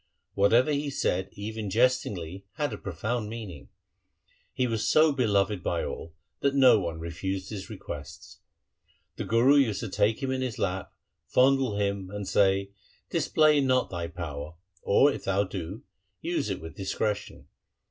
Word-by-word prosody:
Whatever 115 +8 +4
he 145 0 -1
said 95 -8 -1
even 105 0 -5
jest 125 +5 +3
ingly 90 -1 -6
had 150 -1 -2
a - - -4
profound 105 +5 -3
meaning. 105 - -8 0.8
He 130 -1 0
was 115 -3 0
so 155 0 +5
beloved 105 -7 +1
by 85 -1 -1
all, 80 0 -7 0.2
that 140 0 +1
no 130 -5 +7
one 85 -3 -4
refused 95 +4 -4
his 100 -3 -6
requests. - - -9 0.8
The - - -3
Guru 125 +6 +5
used 110 -8 +2
to 115 - -4
take 110 +7 +1
him 130 - 0
in 130 0 -1
his 125 -4 -3
lap, 95 0 -2 0.4
fondle 130 -4 +3
him, 100 -2 -1
and 100 -1 -5
say 95 0 +2 0.2
' - - -36
Display 150 -2 +3
not 130 -1 +2
thy 85 -2 -3
power, 75 -3 -6 0.3
or, 140 +8 +4
if - - -8
thou 100 +1 +2
do, 95 +1 -6 0.4
use - - -2
it - - -2
with 80 0 -9
discretion. 105 +2 -3
105 Hz, 160 wpm, -28 LUFS, 95-125 Hz, 0.8 s, no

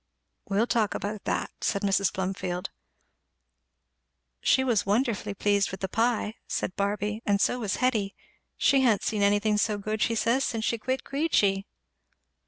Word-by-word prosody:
"We'll 205 +3 +2
talk 225 -4 0
about 205 0 -4
that," - - -1
said 200 -2 0
Mrs. 195 -1 +2
Plumfield. 185 -1 -3 1.7
"She 265 - +3
was 240 -6 +2
wonderful 210 -1 0
pleased 200 0 +2
with 190 - -7
the 190 - -1
pie," 225 +1 0
said 180 - -2
Barby, 210 +2 -1
"and 200 -1 +1
so 250 - +1
was 210 -5 -1
Hetty; 220 -6 0 0.4
she 275 -1 +4
ha'n't 230 -6 +3
seen 215 -2 -1
anything 205 +1 +3
so 210 -1 +1
good, 215 +1 -3
she 230 - +2
says, 235 +4 +2
since 225 -2 -2
she 230 - 0
quit 260 +4 -2
Queechy." 210 -10 +1
210 Hz, 155 wpm, -27 LUFS, 200-230 Hz, 1.7 s, she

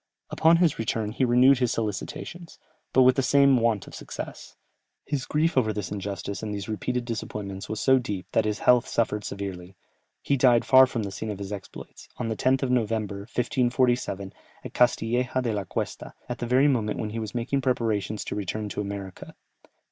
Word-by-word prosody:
Upon 165 +1 +4
his 170 -7 +2
return 110 -1 -1
he 125 - -1
renewed 125 +2 +5
his 125 -2 +1
solicitations, 150 - -5 0.3
but 130 - +5
with 130 +1 +5
the - - +3
same 140 0 +5
want 115 -4 +1
of - - -13
success. - - -8 0.5
His 140 -2 -3
grief 160 +2 +1
over 115 -5 +3
this 105 -3 -4
injustice 100 -1 -4
and 110 -1 -4
these 100 -1 -5
repeated 120 +3 -2
disappointments 105 -4 -5
was 110 - -3
so 130 -1 +5
deep, 105 -6 -4
that 110 - +2
his 105 -1 -1
health 125 -2 +5
suffered 105 -2 0
severely; 95 -2 -6 0.5
he 140 - +1
died 125 -2 +4
far 130 0 +7
from 120 -3 -3
the 100 - -4
scene 110 +3 -5
of 105 - -4
his 100 +1 -6
exploits, 100 -1 -10
on 120 -2 -3
the 110 - -1
10th 130 +4 +1
of 130 - 0
November, 110 -4 0
1547, 120 -2 0 0.3
at - - -7
Castilleja 125 +1 +1
de 115 -3 -1
la 100 -2 -2
Cuesta, - - -5
at 120 - -5
the 120 - -3
very 130 +4 +4
moment 115 -7 0
when 105 -1 -3
he 115 - -4
was 110 +1 -6
making 130 +4 -1
preparations 110 -5 -1
to - - -4
return 105 +1 -3
to 105 - -3
America. 100 -2 -7
115 Hz, 195 wpm, -26 LUFS, 105-130 Hz, 0.5 s, far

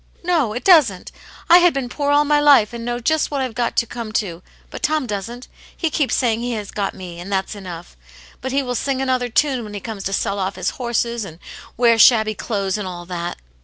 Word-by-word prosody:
No, 325 -11 +1
it 245 - -5
doesn't. 285 - +4 0.4
I 345 +2 +8
had 350 -3 +4
been 270 -2 -2
poor 285 +3 -2
all 290 +1 +4
my 295 0 +3
life, 280 -7 +5
and 235 -1 -6
know 240 0 -2
just 315 +6 +1
what 285 - -2
I've 260 -3 -2
got 240 0 -2
to 235 - +3
come 230 -1 -7
to; 180 -6 -2 0.3
but - - -7
Tom 310 -3 +1
doesn't. 230 +3 -5 0.3
He 330 -3 -1
keeps 290 -3 +1
saying 230 -3 +1
he 240 +1 -3
has 210 -3 -5
got 200 -2 -3
me, 175 -2 -9
and 185 +3 -8
that's 190 +1 -1
enough. 180 - -9 0.5
But 260 - -4
he 275 +1 +1
will 250 -1 -3
sing 265 +2 -1
another 255 -2 0
tune 260 0 +1
when 210 -1 -8
he - - -4
comes 215 -2 -7
to 195 - -2
sell 200 +1 -1
off 190 0 -2
his - - -2
horses, 235 -1 -2
and 165 -5 -9 0.4
wear 235 -1 +4
shabby 220 -1 +6
clothes, 200 -2 -2
and 200 - -4
all 175 -1 -7
that." 175 -1 -5
235 Hz, 235 wpm, -20 LUFS, 200-265 Hz, 0.5 s, I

